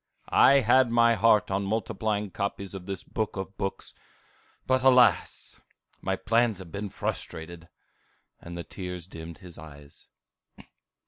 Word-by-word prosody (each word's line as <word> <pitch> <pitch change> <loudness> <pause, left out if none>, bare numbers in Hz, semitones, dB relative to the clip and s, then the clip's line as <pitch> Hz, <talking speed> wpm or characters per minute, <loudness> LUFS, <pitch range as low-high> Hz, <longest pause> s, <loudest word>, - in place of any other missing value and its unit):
I 140 0 +6
had 125 +2 +4
my 115 0 +4
heart 110 -1 +3
on 95 +1 0
multiplying 105 0 -2
copies 100 0 -4
of 95 -1 -8
this 95 -2 -5
Book 110 -1 -3
of 95 +1 -6
books, 95 0 -5 0.7
but 130 0 +2
alas! 125 -2 +3 0.4
my - - -1
plans 115 -1 +1
have 90 -3 -11
been 100 0 -5
frustrated!" 85 -1 -6 0.7
and 85 0 -9
the 85 - -5
tears 90 -2 -7
dimmed 85 -2 -10
his 90 -5 -12
eyes. 75 -2 -14
100 Hz, 135 wpm, -27 LUFS, 90-115 Hz, 0.7 s, I